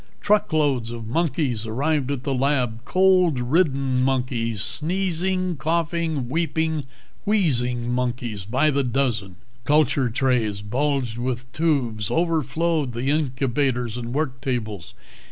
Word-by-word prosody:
Truckloads 150 - +2
of 115 -1 -6
monkeys 130 -4 -1
arrived 140 +4 0
at 140 -3 -2
the 140 - -1
lab 125 -4 0
cold 185 -5 +4
ridden 135 -1 +1
monkeys, 125 -4 0
sneezing, 185 +1 -1
coughing, 165 -3 -1
weeping, 160 +1 -1 0.4
wheezing 125 - +1
monkeys 120 -5 -2
by 130 +9 +2
the 140 0 +1
dozen. 120 -7 -1 0.3
Culture 145 -2 +3
trays 115 -5 0
bulged 125 +1 -1
with 125 0 -3
tubes, 125 -10 0
overflowed 160 -3 0
the 125 +4 -1
incubators 130 -4 0
and 120 -1 -5
work 130 -2 -2
tables. 110 -9 -3
135 Hz, 115 wpm, -23 LUFS, 120-155 Hz, 0.4 s, cold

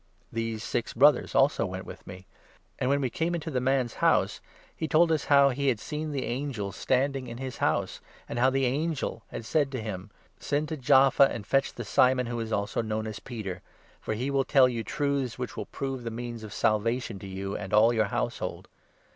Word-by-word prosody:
These 115 -1 -3
six 115 - -2
Brothers 140 +2 +4
also - - +4
went - - -6
with - - -11
me. 90 +1 -10 0.5
And, 130 - 0
when 140 +1 +2
we 130 -3 -1
came 170 +2 -1
into 160 -1 -4
the 130 -3 0
man's 130 -2 +1
house, - - +2 0.3
he 160 - -3
told 165 +2 +4
us 155 -3 +1
how 140 -1 +6
he 140 +2 -1
had 120 -5 +2
seen 150 +5 -4
the 135 -3 -2
angel 120 -6 -3
13 - - -11
standing 135 0 +1
in 115 0 -7
his 130 -1 -6
house, - - 0 0.3
and 120 - -4
how 130 +2 +5
the 135 0 +1
angel 140 -2 -1
had 115 - -7
said 145 +1 +1
to 130 - -2
him 105 -3 -6
— - - -31
' 100 - -38
Send 145 +1 -1
to 155 - -3
Jaffa 135 +1 +5
and 105 - -5
fetch 135 +5 +1
the 120 - -6
Simon, 125 +4 +3
who 120 0 -3
is 115 -1 -4
also 100 +2 0
known 110 -1 -2
as 110 -1 -5
Peter; 100 -7 -6 0.4
for 110 - -3
he 130 +5 -2
will 135 -1 +2
tell 135 -1 +5
you 120 -2 -3
truths, 140 -3 -1
which 125 -1 -5
will - - -5
prove 135 -1 -4
the 120 -1 -5
14 110 - -7
means 120 -1 -6
of 105 - -8
Salvation 115 0 0
to 100 - -9
you 95 +1 -4
and 95 -2 -6
all 110 +3 +5
your 110 -2 +2
household.' - - -3
125 Hz, 225 wpm, -28 LUFS, 110-140 Hz, 0.5 s, how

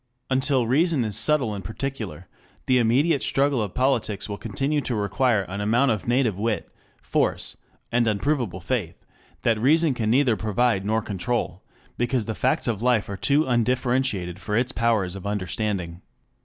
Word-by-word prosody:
Until 130 -1 +2
reason 145 +1 +2
is 105 -2 -2
subtle 115 +1 +2
and 100 -2 -6
particular, 110 - -5 0.4
the 130 -1 +3
immediate 135 +6 +2
struggle 140 -3 +2
of 100 -4 -4
politics 125 -6 0
will 100 -1 -5
continue 135 +8 -1
to 125 - -2
require 105 +1 +1
an 95 +2 -5
amount 120 +6 +3
of 105 -6 -3
native 120 -5 +1
wit, 110 -1 -2 0.3
force, - - -1 0.4
and 120 -1 +2
unprovable 110 - -1
faith, 90 -2 -3 0.4
that 115 -2 +2
reason 155 +3 +4
can 115 -3 -1
neither 125 -1 +3
provide 110 -1 +1
nor 110 0 +1
control, 95 -2 -2 0.4
because 120 -1 0
the 110 - -3
facts 125 +4 0
of 110 -3 -1
life 120 -4 +2
are 100 - -3
too 145 +8 +2
undifferentiated 120 -6 0
for 105 +1 -2
its 120 +1 +1
powers 110 -6 0
of 95 +1 -6
understanding. 95 -3 -3
115 Hz, 160 wpm, -24 LUFS, 100-130 Hz, 0.4 s, reason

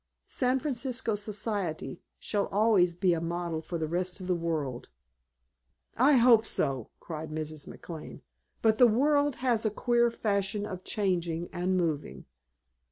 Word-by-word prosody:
San 255 0 0
Francisco 255 -4 -1
Society 205 - -3 0.2
shall 205 -2 -1
always 195 -4 +3
be 180 0 +2
a 165 - -1
model 170 -1 -3
for 170 +1 -5
the 160 -1 -2
rest 180 +3 -2
of 185 - -7
the 180 - +1
world." 155 -7 -3 1.1
"I 270 +5 +5
hope 235 -3 +6
so!" 135 - -1
cried 160 -1 -6
Mrs. 155 -1 -5
McLane. 160 -3 -9 0.4
"But 220 -1 +3
the 250 - +8
world 285 +4 +2
has 235 -3 +2
a 220 - +2
queer 240 +2 +2
fashion 205 -2 -1
of 185 -3 -6
changing 175 -5 -1
and 185 +1 0
moving." 160 -5 -2
190 Hz, 145 wpm, -29 LUFS, 165-230 Hz, 1.1 s, the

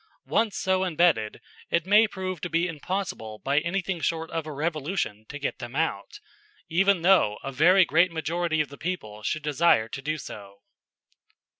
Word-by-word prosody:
Once 220 -3 0
so 190 0 +1
imbedded, 160 - +1 0.3
it 170 0 +1
may 210 +3 +5
prove 185 -4 -5
to 175 - -3
be 170 +2 +1
impossible 165 - -4
by 140 +5 +1
anything 175 +1 -2
short 165 0 -2
of 165 -1 -3
a - - -5
revolution 150 - -3
to 145 - -6
get 140 -2 -4
them 120 0 -8
out, 150 -11 -2 0.5
even 190 +1 +2
though 170 - +4
a 135 - -4
very 180 +7 +5
great 170 +4 +3
majority 160 0 -1
of 150 - -3
the 140 - -12
people 110 -12 -5
should 155 +7 -2
desire 150 -6 +3
to 135 - -7
do 155 +3 -2
so. 100 -7 -10
160 Hz, 170 wpm, -26 LUFS, 140-180 Hz, 0.5 s, may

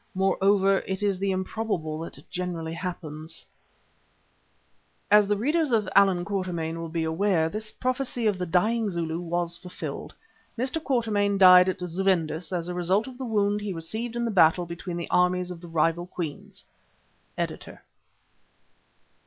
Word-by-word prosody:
Moreover, 195 +1 +3
it 190 +1 -3
is 200 -3 +1
the 195 0 0
improbable 185 -4 -2
that 165 - -9
generally 170 -3 -4
happens[*] 160 -3 -6 0.8
[*] - - -41
As 210 -1 +7
the 205 0 +1
readers 300 +6 +1
of 220 -3 +2
"Allan 190 -3 +5
Quatermain" 175 -5 -3
will 165 0 -5
be 165 0 -2
aware, 160 0 +1
this 215 +3 -5
prophecy 255 -2 -2
of 205 -3 +1
the 180 - -2
dying 215 +6 +2
Zulu 165 -2 -2
was 175 0 -2
fulfilled. 180 +1 -7 0.4
Mr. 260 +6 -1
Quatermain 210 -6 +1
died 180 -1 +8
at 185 - -2
Zuvendis 175 -2 0
as 175 -2 -2
a 180 - -3
result 180 +4 +1
of 260 -1 -10
the 260 - -3
wound 210 -2 +1
he 205 -2 -3
received 220 +8 -5
in 235 0 -1
the 230 - -1
battle 175 -2 +4
between 170 +1 -6
the 170 - -5
armies 180 0 +2
of 170 -2 -8
the 175 - -10
rival 165 +1 0
Queens. 170 -5 -6 0.7
Editor. - - -5
185 Hz, 155 wpm, -26 LUFS, 170-210 Hz, 0.8 s, died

